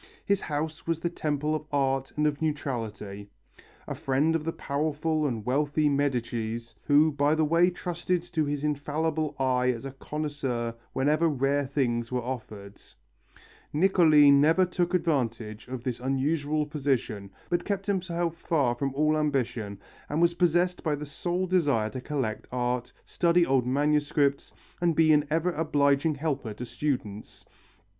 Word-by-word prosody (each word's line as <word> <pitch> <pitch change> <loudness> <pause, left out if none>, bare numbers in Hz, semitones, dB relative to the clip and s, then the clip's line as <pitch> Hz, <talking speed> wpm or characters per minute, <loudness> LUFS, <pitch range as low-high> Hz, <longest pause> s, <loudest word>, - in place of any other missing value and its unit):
His 200 -1 +1
house 155 +1 -4
was 165 -1 0
the 170 +1 -2
temple 150 -2 -1
of 155 -1 -3
art 135 -2 0
and 150 - +2
of 150 0 0
neutrality. 110 -9 -4 0.6
A - - -3
friend 145 +5 +1
of 160 - -1
the 165 - -1
powerful 155 +1 -1
and 115 -5 -4
wealthy 145 +3 +1
Medicis, 120 -5 -1
who 150 +2 +5
by 145 +1 +2
the 160 -1 +2
way 170 +3 +4
trusted 175 0 -2
to 165 -3 -1
his 145 -1 -2
infallible 150 +1 -1
eye 130 -2 +1
as 125 +1 -2
a 135 - -5
connoisseur 135 -4 -3 0.2
whenever 150 +5 +2
rare 140 0 0
things 120 -4 -1
were 125 -1 -1
offered, 105 -5 -7 0.9
Niccoli 155 -4 +5
never 155 +6 +5
took 180 0 -1
advantage 115 -10 -1
of 125 -1 -6
this 125 -2 -3
unusual 145 +3 0
position, 130 -9 -2 0.2
but 175 - 0
kept 200 -1 -2
himself 175 -4 -1
far 145 -7 +1
from 135 +2 -3
all 155 +2 +2
ambition 125 -9 -1 0.3
and 150 - -1
was 170 0 +4
possessed 175 +1 +1
by 155 -3 0
the 150 +1 -6
sole 175 +5 -2
desire 145 -12 +1
to 130 - -6
collect 125 -6 -3
art, 125 0 -1
study 170 0 +2
old 130 -4 +2
manuscripts, 145 0 +1 0.3
and 170 -2 +2
be 160 0 +5
an 150 0 +3
ever 165 +3 +1
obliging 145 -1 +2
helper 140 -7 -3
to 125 - -6
students. 115 -6 -4
145 Hz, 150 wpm, -27 LUFS, 130-160 Hz, 0.9 s, who